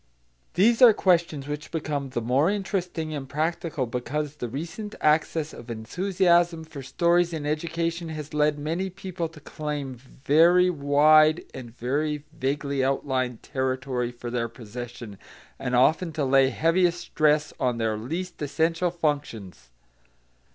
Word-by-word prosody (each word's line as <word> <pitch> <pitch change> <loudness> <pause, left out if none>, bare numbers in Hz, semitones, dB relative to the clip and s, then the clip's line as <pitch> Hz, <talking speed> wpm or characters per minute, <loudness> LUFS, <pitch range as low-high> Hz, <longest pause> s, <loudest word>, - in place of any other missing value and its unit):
These 225 +7 +4
are 240 -3 +9
questions 170 -8 +1
which 150 0 -5
become 150 -4 -3
the 120 -2 -3
more 135 +8 +2
interesting 180 -5 -2
and 140 -3 -6
practical 160 -1 -2
because 140 +5 -4
the 120 -4 -4
recent 170 - -6
access 155 0 +1
of 120 - -11
enthusiasm 175 - +1
for 155 -3 -9
stories 170 +6 +2
in 155 -2 -4
education 165 +2 -2
has 155 -2 -7
led 150 0 +2
many 165 +6 -2
people 185 -3 -5
to 160 -1 -14
claim 150 -3 -5
very 160 +8 +3
wide 155 +1 +4
and 125 -3 -8
very 145 +5 -2
vaguely 140 -2 -1
outlined 130 -3 -1
territory 130 -2 -2
for 120 0 -7
their 115 -1 -1
possession, 120 -2 -9 0.4
and 125 -2 -1
often 160 +7 +3
to 150 -2 -1
lay 135 0 +4
heaviest 175 +4 +2
stress 155 -2 +1
on 125 -2 0
their 110 -1 0
least 165 +12 -5
essential 165 +4 0
functions. 140 - -3
150 Hz, 135 wpm, -25 LUFS, 130-170 Hz, 0.4 s, are